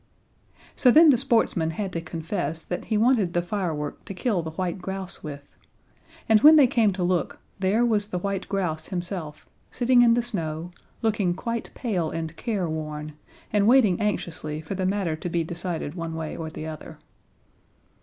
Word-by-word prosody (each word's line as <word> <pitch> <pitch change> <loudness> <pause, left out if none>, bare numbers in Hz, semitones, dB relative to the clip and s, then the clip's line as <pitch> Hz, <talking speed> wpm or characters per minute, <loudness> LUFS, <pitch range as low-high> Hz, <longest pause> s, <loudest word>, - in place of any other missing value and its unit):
So 255 - +4
then 310 +4 +8
the - - +5
sportsman 225 -10 +1
had 190 +3 -4
to 165 - -2
confess 165 -1 -4
that 180 - -4
he 220 - 0
wanted 220 -6 +3
the 175 - +2
firework 170 -6 -3
to 195 - -7
kill 205 -3 0
the 160 - -5
white 180 +3 -3
grouse 190 0 -5
with; 145 -2 -9 0.7
and, 220 -1 +5
when 310 +1 +9
they 295 -3 +8
came 230 -4 +3
to 185 -1 -2
look, 175 -1 0 0.2
there 200 +5 +2
was 210 -3 +1
the 185 - -3
white 195 +1 -3
grouse 165 -6 -2
himself, 175 -4 -5 0.2
sitting 245 0 +3
in 235 -1 +6
the 240 - +1
snow, 170 -7 -4 0.3
looking 205 -5 +1
quite 230 +3 -4
pale 185 -10 -1
and 160 0 -5
careworn, 155 -8 -3 0.4
and 205 -1 +3
waiting 225 -8 +5
anxiously 165 -7 -2
for 160 +5 -6
the 190 -1 -1
matter 190 -5 0
to 165 +3 -5
be 170 0 0
decided 170 -2 -4
one 165 -2 -5
way 160 -1 -4
or 160 -1 -5
the 155 - -7
other. 160 0 -8
180 Hz, 175 wpm, -25 LUFS, 160-215 Hz, 0.7 s, when